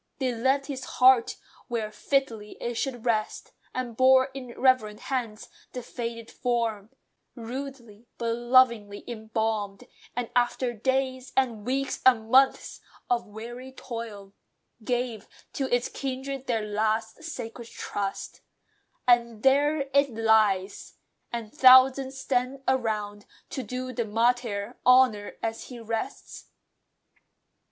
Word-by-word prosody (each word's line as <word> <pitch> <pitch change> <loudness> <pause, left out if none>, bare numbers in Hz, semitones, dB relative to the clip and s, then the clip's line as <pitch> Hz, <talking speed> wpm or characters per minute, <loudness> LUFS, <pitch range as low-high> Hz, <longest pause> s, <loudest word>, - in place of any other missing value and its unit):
They 260 -2 -1
left 265 +4 +1
his 270 -2 -5
heart 255 -2 +5 0.3
where 225 -3 -3
fitly 225 -4 -2
it 240 - -3
should 245 0 -3
rest; 220 -3 -1 0.2
And 250 -3 -4
bore, 260 +1 +5
in 255 -3 -9
reverent 255 -5 +3
hands, 235 -5 -4 0.3
the 250 - -5
faded 230 -1 -6
form, 230 -4 -1 0.5
Rudely, 240 -2 -8
but 230 -1 -1
lovingly 240 -4 +3
embalmed; 220 -3 -3 0.3
and 245 -1 -3
after 245 0 +1
days, 260 +2 -1
And 235 -5 0
weeks, 270 +1 -1
and 225 -3 +4
months, 265 +1 +3 0.3
of 235 -1 +1
weary 240 +5 -9
toil, 225 -6 -8 0.5
Gave 240 -2 -2 0.3
to 270 -2 -2
its 245 0 +2
kindred 270 0 -5
their 225 -3 0
last 220 +4 -1
sacred 235 -6 -7
trust; 200 -3 -5 0.7
And 235 -3 +3
there 285 +3 +3
it 280 0 +4
lies! 215 -4 +2 0.4
and 230 -2 -5
thousands 265 0 +6
stand 260 +1 -1
around, 215 -5 -1 0.2
To 265 - -3
do 255 +2 -5
the 235 -2 -1
martyr 230 -1 0
honour 250 -5 +4
as 225 0 -3
he 245 -2 -9
rests. 230 +4 -5
240 Hz, 120 wpm, -27 LUFS, 220-260 Hz, 0.7 s, thousands